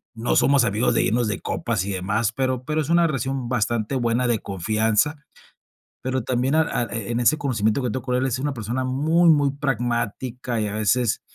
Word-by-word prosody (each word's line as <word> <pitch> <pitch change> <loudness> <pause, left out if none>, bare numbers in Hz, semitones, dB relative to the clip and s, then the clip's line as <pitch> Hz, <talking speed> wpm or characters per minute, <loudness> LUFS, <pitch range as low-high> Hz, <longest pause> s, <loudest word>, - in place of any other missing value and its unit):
no 115 +2 -1
somos 140 -3 +4
amigos 110 +2 +1
de - - +3
irnos 120 0 +1
de 105 - -2
copas 90 - -2
y 100 - -3
demás, 100 +5 -1
pero 130 -1 -1
pero 155 +4 -1
es 150 - -5
una 170 0 +4
relación 135 -3 -2
bastante 120 0 -1
buena 120 0 +1
de 120 -2 +1
confianza, 110 - 0 0.8
pero 130 -1 -2
también 130 +4 0
a 160 - +5
a 150 - -1
e-en 115 +1 -2
ese 155 +6 +4
conocimiento 115 -4 0
que 125 - -1
tengo 125 +3 -4
con 125 -1 -1
él 130 +1 +1
es 130 -2 -1
una 145 +1 -2
persona 120 +2 -3
muy 155 +7 +2
muy 145 -3 +4
pragmática 120 -3 -2
y 105 - -1
a 100 - -4
veces, 110 +2 +1
125 Hz, 200 wpm, -23 LUFS, 110-135 Hz, 0.8 s, a